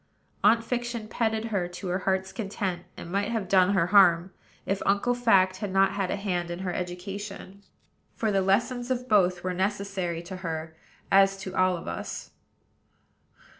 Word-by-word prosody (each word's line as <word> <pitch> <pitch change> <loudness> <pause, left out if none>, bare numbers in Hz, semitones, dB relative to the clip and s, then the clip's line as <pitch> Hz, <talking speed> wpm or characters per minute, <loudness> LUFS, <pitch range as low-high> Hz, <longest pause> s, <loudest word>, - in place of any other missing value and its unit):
Aunt 230 +2 +5
Fiction 240 -2 -3
petted 220 0 -1
her 180 -3 0
to 175 +2 -7
her 180 +1 0
heart's 190 0 -1
content, 195 -5 -3
and 170 - -8
might 200 +2 0
have 220 -5 -2
done 190 +1 +4
her 175 -3 +3
harm, 180 -2 +5 0.3
if 195 0 -1
Uncle 200 +5 +2
Fact 195 -6 +3
had 205 -2 -4
not 195 0 +4
had 195 -2 -2
a - - 0
hand 180 -4 -2
in 175 - -4
her 180 - -2
education; 195 +2 -6 0.5
for 220 -2 0
the 195 -1 +2
lessons 240 +6 +1
of 250 -1 -2
both 185 -5 +3
were 185 0 -1
necessary 190 -3 -2
to 185 +2 -7
her, 160 -3 -5 0.4
as 195 0 +5
to 190 0 -6
all 185 -1 +3
of - - -10
us. - - -6
195 Hz, 170 wpm, -27 LUFS, 180-210 Hz, 0.5 s, Aunt